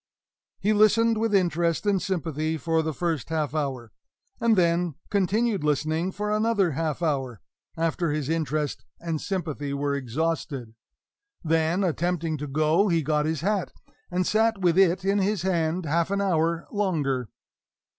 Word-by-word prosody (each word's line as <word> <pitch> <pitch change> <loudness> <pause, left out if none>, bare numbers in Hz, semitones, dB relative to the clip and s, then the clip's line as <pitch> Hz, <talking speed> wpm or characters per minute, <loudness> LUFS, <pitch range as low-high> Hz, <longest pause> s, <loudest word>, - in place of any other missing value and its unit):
He 210 +2 +2
listened 215 +2 +4
with 225 -2 +1
interest 170 -1 +1
and 200 -3 +2
sympathy 160 -4 -2
for 160 +3 +1
the 160 0 -2
first 160 -2 -2
half 155 -3 -1
hour; 135 -7 -3 0.5
and 230 -1 +3
then 170 -3 +2 0.2
continued 205 0 +1
listening 155 +4 0
for 210 +2 -3
another 215 -5 +2
half 155 +2 -2
hour, 135 - -1 0.4
after 165 +1 0
his 150 -2 -2
interest 155 -2 -1 0.2
and 165 -3 -3
sympathy 155 -7 -3
were 140 0 -1
exhausted. 140 -2 -2 0.7
Then, 165 +3 +1
attempting 170 -2 -1
to 150 - -4
go, 155 +7 +2
he 165 -4 +1
got 150 +1 +1
his 160 -2 -2
hat, 200 +1 -1 0.4
and 180 0 0
sat 220 +2 +2
with 175 -2 +3
it 190 0 +3
in 200 +1 +2
his 195 -1 0
hand 170 -1 0
half 165 +3 +1
an 200 0 0
hour 170 -3 +1
longer. 145 - -1
165 Hz, 150 wpm, -26 LUFS, 155-190 Hz, 0.7 s, listened